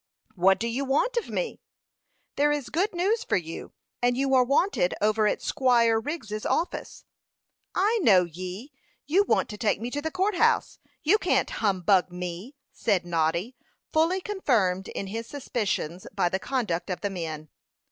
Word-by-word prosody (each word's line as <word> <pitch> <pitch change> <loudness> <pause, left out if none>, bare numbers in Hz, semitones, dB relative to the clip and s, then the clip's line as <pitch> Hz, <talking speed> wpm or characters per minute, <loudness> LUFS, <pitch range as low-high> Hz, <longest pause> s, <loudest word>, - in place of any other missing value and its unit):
"What 190 0 +3
do 230 - -1
you 245 +4 -2
want 290 - +1
of 475 - -1
me?" - - -3 0.7
"There 295 +1 +3
is 290 -4 -2
good 380 +7 0
news 400 +6 0
for - - +1
you; 165 -2 -6 0.3
and 245 0 +2
you 270 0 +1
are 255 -1 +6
wanted 275 - +1
over 215 0 +2
at - - -1
Squire 235 -4 +3
Wriggs's 225 -6 -5
office." 345 - -2 0.7
"I 425 +5 +2
know 195 - +6
ye! 185 - -7 0.3
You 360 +8 +3
want - - +2
to 210 -2 -8
take 210 -4 +1
me 235 +2 -4
to 290 - -2
the 320 - -2
court 380 +5 0
house. - - +2 0.2
You 395 +8 +4
can't - - +1
humbug 190 -3 +2
me," 180 +8 -6 0.2
said 200 -6 0
Noddy, 170 +7 0 0.4
fully 330 +4 +2
confirmed 225 - 0
in - - -5
his 225 +4 -5
suspicions 210 - -3
by 185 -3 +2
the 190 - -1
conduct 210 -9 -2
of 180 -2 -3
the 205 - -2
men. 160 -4 -5
230 Hz, 170 wpm, -26 LUFS, 185-295 Hz, 0.7 s, are